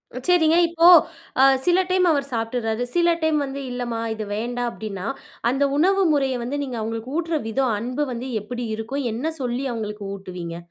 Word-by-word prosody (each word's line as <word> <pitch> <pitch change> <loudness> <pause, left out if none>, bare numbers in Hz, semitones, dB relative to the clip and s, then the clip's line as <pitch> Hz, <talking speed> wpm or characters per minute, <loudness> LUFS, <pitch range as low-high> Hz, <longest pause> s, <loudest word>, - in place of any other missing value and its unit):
ம் 255 - -5
சரிங்க. 335 -2 +4
இப்போ, 335 +1 +5 0.5
அ - - +7 0.2
சில 355 +1 +4
டைம் 365 0 +3
அவர் 280 -2 +1
சாப்ட்டுர்றாரு. 225 0 -1
சில 345 0 +4
டைம் 315 -1 +2
வந்து, 275 +1 -6
"இல்லம்மா 240 -2 -3
இது 220 -1 -5
வேண்டாம்" 240 +2 -2
அப்டீன்னா, 205 -2 -6 0.4
அந்த 270 +3 +1
உணவு 385 +5 +3
முறைய 270 -3 +1
வந்து, 275 +4 -3
நீங்க 255 -4 -5
அவுங்களுக்கு 225 +4 -4
ஊட்டுற 330 -1 0
விதம் 250 0 +1
அன்பு 250 +6 -2
வந்து 245 +2 -5
எப்பிடி 245 +3 -5
இருக்கும்? 245 +6 -4
என்ன 295 +9 -2
சொல்லி 250 +1 -2
அவுங்களுக்கு 210 -2 -5
ஊட்டுவீங்க? 180 -3 -7
250 Hz, 175 wpm, -23 LUFS, 225-300 Hz, 0.5 s, அ